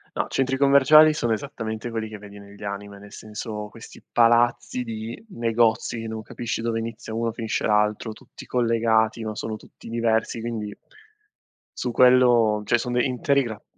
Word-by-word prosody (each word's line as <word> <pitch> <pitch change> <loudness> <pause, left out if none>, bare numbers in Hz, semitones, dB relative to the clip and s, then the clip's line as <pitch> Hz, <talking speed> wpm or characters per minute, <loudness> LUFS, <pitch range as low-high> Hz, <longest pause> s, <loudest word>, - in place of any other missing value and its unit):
No, - - -1
centri 135 0 0
commerciali 140 +3 +7
sono 120 -6 0
esattamente 110 -2 -5
quelli 110 -1 -3
che 110 -1 -9
vedi 100 0 -12
negli 100 +1 -13
anime, 100 0 -6
nel 100 0 -14
senso 105 0 -7
questi - - -13
palazzi 120 +1 +3
di 115 - -7
negozi, 115 - 0
che 115 - -6
non 110 0 -5
capisci 115 +1 -5
dove 115 0 -1
inizia 115 -1 -6
uno 115 0 -1
finisce 110 -1 -3
l'altro, 105 +1 +1
tutti - - -14
collegati, 115 -2 +1
ma 110 -1 -4
sono 110 +1 -4
tutti 110 - -14
diversi 115 0 0
quindi 110 -3 -5 1.0
su 125 - -2
quello 120 -4 +5
cioè 120 - +4
son 125 +1 -4
de 125 0 +2
interi 140 +2 +1
grat 110 -3 -7
115 Hz, 165 wpm, -24 LUFS, 110-120 Hz, 1.0 s, commerciali